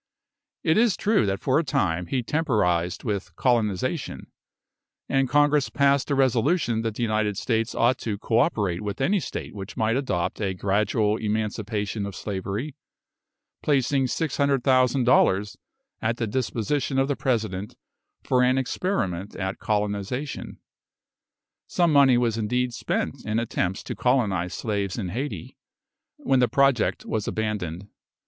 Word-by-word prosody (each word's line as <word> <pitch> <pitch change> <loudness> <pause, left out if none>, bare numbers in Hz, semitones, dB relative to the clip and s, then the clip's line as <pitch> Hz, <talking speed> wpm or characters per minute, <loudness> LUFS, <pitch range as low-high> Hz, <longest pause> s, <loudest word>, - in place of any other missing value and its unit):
It 160 +7 +3
is 230 -4 +3
true 210 - +2
that 95 0 -1
for 130 +3 +2
a - - 0
time 90 - 0
he 125 +6 -1
temporised 100 - 0
with 100 -4 -3
"colonisation;" 120 - -1 0.8
and 135 -1 +1
Congress 145 -3 +3
passed 140 +2 +2
a 140 - +2
resolution 130 -1 +2
that 115 -2 -3
the 120 - -2
United 110 -3 0
States 115 -1 -1
ought 120 +2 +2
to 105 -3 -3
co 110 +2 +1
operate 100 -6 +1
with 105 -1 -4
any 190 +9 +2
state - - -6
which 100 -2 -8
might 110 +1 +1
adopt 105 -9 -1
a 95 -2 -1
gradual 105 +3 +1
emancipation 105 -1 -2
of 100 - -7
slavery, 105 +7 -4 0.9
placing 135 -2 +2
600,000 135 -3 +2
dollars 105 -5 +3 0.5
at 115 +1 0
the 120 - -1
disposition 130 +4 -1
of 135 0 +3
the 140 - 0
President 110 -7 -2 0.5
for 125 - +2
an 125 +1 +3
experiment 105 - -2
at 95 0 -3
colonisation. 105 +6 -2 1.1
Some 170 -3 +2
money 135 -3 +6
was 115 -2 +1
indeed 125 +3 0
spent - - -2
in 110 0 -1
attempts 95 -5 -1
to - - -5
colonise 100 -9 +1
slaves 100 -4 -2
in 95 -6 -3
Hayti, 110 - -5 0.6
when 135 -1 +1
the 125 - +4
project 135 -4 +2
was 110 -2 -2
abandoned. 100 -4 -3
115 Hz, 140 wpm, -25 LUFS, 100-135 Hz, 1.1 s, money